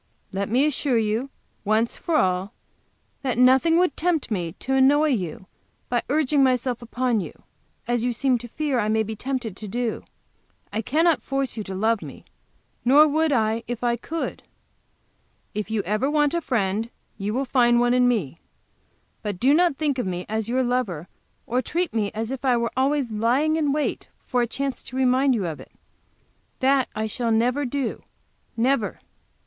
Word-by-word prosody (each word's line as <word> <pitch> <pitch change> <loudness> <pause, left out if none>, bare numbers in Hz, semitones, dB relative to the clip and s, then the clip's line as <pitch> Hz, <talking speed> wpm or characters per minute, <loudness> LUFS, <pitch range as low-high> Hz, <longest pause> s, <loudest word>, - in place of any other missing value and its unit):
Let 200 +1 -2
me 255 +6 +3
assure 285 -4 +1
you, 225 +4 0 0.3
once 220 +3 +1
for 335 - -2
all, 185 -2 +1 0.7
that 255 -4 -1
nothing 265 +7 +5
would 355 -5 +2
tempt 325 -7 0
me 175 -5 -2
to 265 +7 -4
annoy 285 +3 +4
you 190 - -2 0.4
by 240 -1 +1
urging 290 0 +2
myself 250 -2 +1
upon 240 0 0
you, - - -9 0.4
as 240 -1 0
you 245 - +1
seem 250 +1 +1
to 240 - -8
fear 285 +1 -1
I 210 - 0
may 220 0 +2
be 220 +1 -5
tempted 250 -3 -3
to 215 - -8
do. 235 +2 -2 0.7
I 220 - 0
cannot 320 +7 +2
force 270 -1 -2
you 215 - -4
to 190 - -6
love 220 +2 +1
me, - - -10 0.6
nor 285 +5 +6
would 315 +1 +1
I 225 -2 +1
if 240 0 -5
I 240 -1 +2
could. 320 +8 -5 1.1
If 210 0 -3
you 220 -2 -1
ever 215 +8 0
want 295 0 +2
a 340 - 0
friend 220 -4 -1 0.3
you 200 +1 -2
will 265 +5 -1
find 240 -2 +3
one 240 0 +3
in 250 0 +4
me. 185 - -1 0.8
But 205 -4 -4
do 265 +3 +4
not 340 -2 +3
think 290 -4 0
of 245 - -1
me 180 0 -3
as 220 +1 -2
your 260 +2 +1
lover, 230 -10 -2 0.4
or 250 +2 0
treat 345 +5 -2
me 215 -3 0
as 225 +2 -3
if 270 -1 -5
I 255 -3 +3
were 235 0 -1
always 270 -2 +1
lying 245 +9 +2
in 300 -3 +1
wait 295 +1 -2 0.2
for 250 -2 +1
a 240 - +1
chance 275 +3 -3
to 250 - -10
remind 260 +1 +3
you 205 -5 -1
of 160 -3 -4
it. - - -12 0.9
That 265 0 +3
I 215 - -1
shall 230 +2 -2
never 245 +6 +2
do, 260 -1 -2 0.6
never." 235 -2 +1
245 Hz, 185 wpm, -24 LUFS, 220-275 Hz, 1.1 s, nor